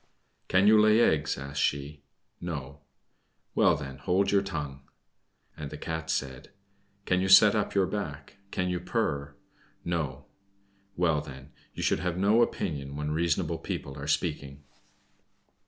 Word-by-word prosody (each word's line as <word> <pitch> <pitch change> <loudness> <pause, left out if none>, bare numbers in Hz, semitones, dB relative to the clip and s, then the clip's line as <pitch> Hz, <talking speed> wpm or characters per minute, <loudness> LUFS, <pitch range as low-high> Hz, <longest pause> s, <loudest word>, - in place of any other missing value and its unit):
"Can 95 +1 +3
you 105 0 +7
lay 110 +1 +5
eggs?" 75 - +2
asked 70 +1 -4
she. 70 +1 -1 0.4
"No." 75 -5 -6 0.7
"Well, - - +4
then, 70 0 -7
hold 95 +7 +1
your 100 -1 +4
tongue." 75 -8 -5 0.7
And 75 -2 -6
the 75 - -8
Cat 80 +1 -5
said, 65 +1 -3 0.6
"Can 90 0 +2
you 95 - 0
set 100 +2 +8
up 105 -2 -1
your 95 -1 +4
back? 80 -6 -5
Can 90 -2 -1
you 90 -1 -1
purr?" 80 -8 -2 0.5
"No." 80 -7 -3 0.7
"Well, 80 -4 +2
then, 70 0 -11 0.2
you - - -4
should - - +2
have 90 -1 -2
no 105 +5 +4
opinion 70 -11 -2
when 75 +1 -3
reasonable 80 0 0
people 70 - -5
are 70 - -6
speaking." 75 -2 -2
80 Hz, 145 wpm, -28 LUFS, 70-95 Hz, 0.7 s, set